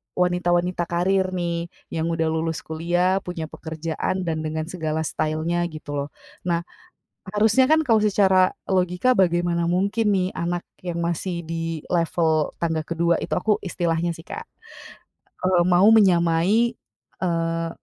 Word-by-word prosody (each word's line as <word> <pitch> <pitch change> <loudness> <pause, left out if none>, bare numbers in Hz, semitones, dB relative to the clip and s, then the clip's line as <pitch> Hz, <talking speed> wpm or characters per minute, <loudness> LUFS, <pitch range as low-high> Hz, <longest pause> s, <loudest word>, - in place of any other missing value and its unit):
wanita-wanita 180 0 +1
karir 185 +2 +1
nih, 170 -1 -2 0.2
yang 165 0 -1
udah 165 -1 0
lulus 160 0 -2
kuliah 175 +4 0
punya 170 -4 -6
pekerjaan 165 +3 -3
dan 160 -2 -2
dengan 155 0 -2
segala 160 -3 -2
style-nya 155 +3 -1
gitu 155 -2 -9
loh. 145 0 -2 0.4
Nah, 170 -1 +1 0.7
harusnya 220 +6 +3
kan 315 0 +4
kalau 225 -4 +4
secara 190 -3 +3
logika, 185 +6 +2
bagaimana 175 -3 +2
mungkin 200 +5 +1
nih 185 -1 +1
anak 175 +1 -3 0.2
yang 175 -2 -4
masih 170 +1 -2
di 165 -1 -4
level 165 -2 +1
tangga 165 -2 -1
kedua 170 0 +1
itu - - -6
aku, 210 +4 +1
istilahnya 170 -2 -1
sih 165 - -13
Kak, 455 - -7 1.0
eee, 185 -1 +3
mau 180 +3 +5
menyamai 190 +2 +4 0.5
eee, 165 -2 -1
175 Hz, 135 wpm, -23 LUFS, 165-185 Hz, 1.0 s, mau